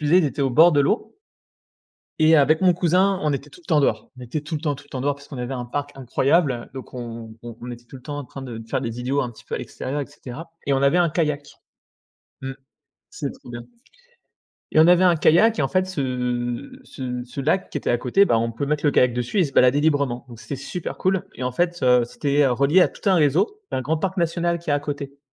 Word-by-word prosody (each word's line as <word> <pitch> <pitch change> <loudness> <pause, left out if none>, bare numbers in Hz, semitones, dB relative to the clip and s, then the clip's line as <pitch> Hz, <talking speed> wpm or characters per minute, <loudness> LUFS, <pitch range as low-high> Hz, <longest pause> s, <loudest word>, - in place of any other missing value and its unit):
ils 150 +3 +2
étaient 145 0 -2
au 135 - +1
bord 160 +7 +7
de 145 - +2
l'eau. 210 - -1 1.0
Et 160 +1 +6
avec 155 +3 +4
mon 185 -1 +5
cousin, 180 +3 +2
on 150 -1 +1
était 140 +1 -5
tout 135 - -16
le - - -29
temps 155 - +3
dehors. 140 - 0
On - - -11
était 125 +5 -4
tout 155 +2 -8
le 150 - -4
temps, 150 -3 -1
tout - - -14
le - - -24
temps 130 - -5
dehors 145 +1 0
parce 140 0 -16
qu'on 140 - -8
avait 125 +2 -3
un 125 -1 -4
parc 145 +3 -4
incroyable. 135 0 +1
Donc 130 -1 -9
on 115 -2 -7
on 120 +1 -8
était 120 0 -10
tout 125 - -13
le 130 - -11
temps 145 -1 -5
en - - -6
train 135 +1 -10
de 120 -3 -7
faire - - 0
les 115 -1 -4
idiots 135 +3 0
un 120 - -3
petit - - -16
peu - - -5
à - - -2
l'extérieur 140 +3 -5
et 140 - -2
cetera. 140 +8 -10 0.2
Et 140 - +3
on 135 - +1
avait 140 +5 +4
un 175 -1 +3
kayak, 150 -3 -1 0.9
mmh. 135 0 -4 0.6
C'était 145 -4 -5
trop - - -14
bien. 120 0 -7 1.1
Et 155 - +5
on 160 - +7
avait 180 +1 +5
un 175 -2 +5
kayak 195 +9 +4
et - - +2
en 135 - +1
fait, 185 +6 +1
ce 125 - -3
ce 125 - -5
ce 125 +3 -7
lac 170 +7 +1
qui - - -6
était 150 - -1
à 120 - +2
côté, 130 +12 +3
bah, 115 - +2
on 115 +1 0
peut 115 +5 -3
mettre 150 +1 0
le - - +5
kayak 125 -3 +3
dessus 125 - -2
et 185 - +5
se 140 - -5
balader 130 +2 +4
librement. 140 -6 +1
Donc 120 -2 -12
c'était 140 - -6
super 160 +6 -6
cool. 185 -1 +1
Et - - -8
en 125 0 -1
fait, 175 +5 -1
heu, 125 -1 +5
c'était, 145 +3 0
heu, 130 - +3
relié 140 +8 +4
à - - +5
tout - - -17
un 190 - +5
réseau, 175 - +2
un 130 - -2
grand 155 +5 -1
parc 190 +4 -2
national 170 0 0
qui 165 -2 -6
est - - +3
à 145 - +1
côté. 140 -1 -6
140 Hz, 260 wpm, -23 LUFS, 125-165 Hz, 1.1 s, bord